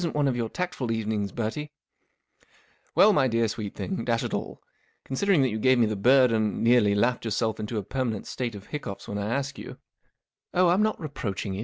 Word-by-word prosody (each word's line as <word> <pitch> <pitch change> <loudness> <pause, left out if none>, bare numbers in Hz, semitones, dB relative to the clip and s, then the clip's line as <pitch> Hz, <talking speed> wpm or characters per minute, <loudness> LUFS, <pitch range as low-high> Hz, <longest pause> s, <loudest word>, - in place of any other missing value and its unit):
This - - 0
isn't 160 - -5
one 145 -1 +2
of 130 - +1
your 115 -2 -2
tactful 175 -8 -3
evenings, 110 -3 -1
Bertie/' 120 +8 -3 0.7
" - - -34
Well, 210 +1 +7
mv 135 -7 +3
dear 115 0 +2
sweet 105 -2 -5
thing, 190 - -3
dash 115 -1 0
it - - -4
all* - - -4 0.4
considering 160 +3 +2
that 130 - +2
you 110 - -3
gave 130 +3 +4
me 120 - +4
the 110 0 -1
bird 125 +4 +5
and 110 -2 0
nearly 115 -4 +4
laughed 120 +4 +1
yourself 110 -1 -1
into 110 +1 -4
a 105 - -2
permanent 120 -1 -3
state 120 -4 -4
of 100 -1 -10
hiccoughs 145 -10 -6
when 105 - -4
I 100 +1 -2
asked 140 +2 -2
you - - -9 0.2
" - - -48
" - - -59
Oh, 180 0 +5
I'm 180 +4 +3
nWt/ 215 0 +1
reproaching 105 - -4
you. 95 - -5
120 Hz, 230 wpm, -26 LUFS, 105-140 Hz, 0.7 s, Well